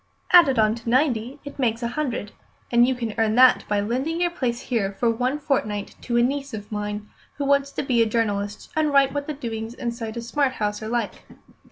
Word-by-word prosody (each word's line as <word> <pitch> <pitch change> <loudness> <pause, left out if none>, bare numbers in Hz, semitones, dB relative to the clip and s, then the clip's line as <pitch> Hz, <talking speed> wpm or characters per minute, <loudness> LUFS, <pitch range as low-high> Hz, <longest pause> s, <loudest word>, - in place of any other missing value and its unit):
"Added 330 -8 +7
on 215 -1 +4
to 230 0 -6
ninety 255 -1 +1
it 285 - -9
makes 235 -2 0
a 235 - 0
hundred, 245 -6 -3 0.4
and 240 0 +5
you 260 - +1
can 230 -3 -4
earn 220 -1 +2
that 255 +1 +6
by 205 -1 +1
lending 260 +10 -1
your 350 -1 +1
place 250 -8 -2
here 205 -6 -1
for 230 +4 +1
one 250 +5 -1
fortnight 215 -9 -2
to 240 -1 -1
a 240 - +5
niece 275 0 -2
of 205 0 -9
mine, 210 0 -4 0.3
who 285 - -3
wants 280 0 +2
to - - -2
be 250 -4 +2
a 225 - +3
journalist 205 -2 -2
and 310 -1 +2
write 275 -1 +4
what 285 -1 -3
the 305 - -2
doings 230 -4 -5
inside 235 -3 -4
a - - -3
smart 260 +3 0
house 210 -2 -2
are 215 - -5
like. 240 0 -3
240 Hz, 220 wpm, -24 LUFS, 220-275 Hz, 0.4 s, Added